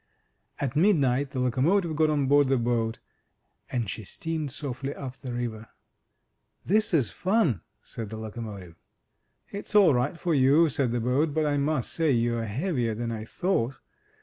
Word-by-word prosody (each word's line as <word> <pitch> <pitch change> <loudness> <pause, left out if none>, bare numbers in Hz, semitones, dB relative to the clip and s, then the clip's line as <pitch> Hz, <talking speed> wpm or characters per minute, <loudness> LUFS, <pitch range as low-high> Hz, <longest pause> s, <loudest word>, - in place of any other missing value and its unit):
At 140 -1 -2
midnight 145 -7 +3
the 135 - -4
locomotive 155 +8 +1
got 155 0 +3
on 145 -2 +1
board 145 +1 +4
the 135 0 +2
boat, 115 -1 0 0.7
and 120 -4 -1
she 110 - -5
steamed 155 - -4
softly 135 0 -5
up 130 -2 -7
the 130 - -7
river. 115 -2 -4 1.0
*This 215 +4 +2
is 140 - +2
fun!" 180 - +1 0.2
said 115 -3 -7
the 110 - -6
locomotive. 105 -6 -8 0.7
It's 205 +1 -7
all 195 -8 +7
right 130 +7 0
for 175 - 0
you,'' 145 +4 +5
said 135 -4 0
the 120 - 0
boat; 140 +6 +1
"but 155 -1 +2
I 145 -1 +1
must 140 -2 0
say 165 -2 +1
you're 120 -2 +1
heavier 120 - -1
than 115 +1 -3
I 110 -1 -5
thought. 135 -4 -1
135 Hz, 165 wpm, -27 LUFS, 115-155 Hz, 1.0 s, all